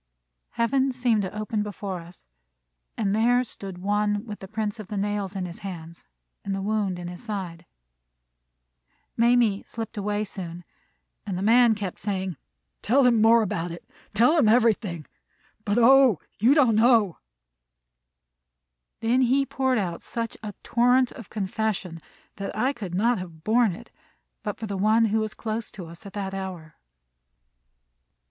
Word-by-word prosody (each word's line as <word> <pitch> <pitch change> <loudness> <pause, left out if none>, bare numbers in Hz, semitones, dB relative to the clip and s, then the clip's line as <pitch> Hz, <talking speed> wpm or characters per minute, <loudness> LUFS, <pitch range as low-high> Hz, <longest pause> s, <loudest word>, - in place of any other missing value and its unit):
Heaven 265 +3 +1
seemed 245 -4 +1
to 195 +2 -5
open 215 0 -2
before 200 -2 -5
us, 170 +1 -14 0.7
and 205 -2 0
there 245 +3 +3
stood 195 -6 -9
One 205 +2 0
with 210 -3 -7
the 190 - -9
prints 215 +1 -3
of 210 - -8
the 210 - -5
nails 205 -1 -2
in 190 -2 -2
his 175 0 -8
hands 170 -4 -8 0.4
and 195 -1 -2
the 195 - -3
wound 205 -3 0
in 175 0 -6
his 175 +6 -9
side. 185 -6 -6 1.5
Mamie 235 -3 +3
slipped 225 -2 -7
away 205 +1 -1
soon, 175 -4 -7 0.6
and 195 -3 -4
the 190 - -3
man 230 +1 +5
kept 200 -3 -5
saying: 190 -3 -3 0.5
"Tell 265 +4 +3
him 235 -3 +4
more 225 +1 +6
about 175 -4 -2
it. 170 0 -9 0.3
Tell 245 +10 +5
him 220 - +4
everything. 215 - +2 0.6
But, 205 +2 +1
O, 250 - +6 0.2
you 245 +7 +5
don't 260 -7 +5
know!" 225 -6 +4 1.8
Then 240 +3 +2
he 265 +2 +3
poured 260 -2 0
out 175 -5 -2
such 230 -1 -4
a 210 -3 -7
torrent 245 +1 +3
of 230 - -11
confession 195 -4 -3 0.4
that 195 +1 -5
I 255 +5 +1
could 195 -9 -6
not 230 +3 +2
have 165 -4 -9
borne 225 -1 +3
it - - -14 0.5
but 210 -2 -4
for 225 - -5
One 215 +4 +3
who 220 - +3
was 215 -1 -3
close 220 0 -4
to 185 - -9
us 170 +5 -11
at 195 - -11
that 195 -2 -4
hour. 185 -5 -6
210 Hz, 155 wpm, -25 LUFS, 190-230 Hz, 1.8 s, more